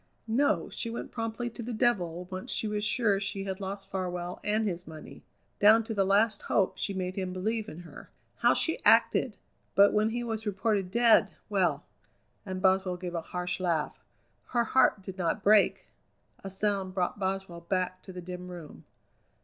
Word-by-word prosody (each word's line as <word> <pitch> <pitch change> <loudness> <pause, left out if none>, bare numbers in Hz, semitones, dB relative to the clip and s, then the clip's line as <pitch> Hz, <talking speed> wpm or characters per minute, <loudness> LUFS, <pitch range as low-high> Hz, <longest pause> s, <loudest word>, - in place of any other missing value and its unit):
No, 250 +6 +1
she 230 - -2
went 230 - -6
promptly 225 +1 -3
to 235 - -8
the 235 0 -4
devil, 180 -7 0
once 185 0 -4
she 220 - +1
was 210 0 -2
sure 210 -2 +2
she 195 0 -3
had 190 0 -4
lost 195 0 -6
Farwell 180 -2 -4
and 215 +1 +1
his 180 -2 -4
money. 155 -1 -11 0.4
Down 220 +2 +6
to 225 - -5
the 200 -2 +2
last 205 +2 +2
hope 190 -2 0
she - - -1
made 185 -1 -3
him 185 -2 -3
believe 215 +4 -2
in 165 - -9
her. 170 -3 -12 0.3
How - - +4
she - - +1
acted! - - +4 0.4
But 200 +1 +6
when 215 +1 +2
he 240 +2 -3
was 220 -2 -3
reported 200 -1 0
dead, 230 +2 +5 0.2
well!" - - +1 0.6
and 185 0 -5
Boswell 190 -1 +2
gave 180 -1 -6
a 170 - -2
harsh 180 +2 -4
laugh 170 -4 -1 0.4
"her 240 -1 +1
heart 230 -4 +3
did 190 0 -8
not 180 +3 -1
break!" 210 0 +4 0.6
A 195 - -5
sound 195 -1 -1
brought 185 +2 -1
Boswell 190 -3 -3
back 185 +1 -2
to - - -11
the 180 -1 -7
dim 180 +1 -7
room. 175 -4 -10
195 Hz, 180 wpm, -29 LUFS, 180-215 Hz, 0.6 s, Down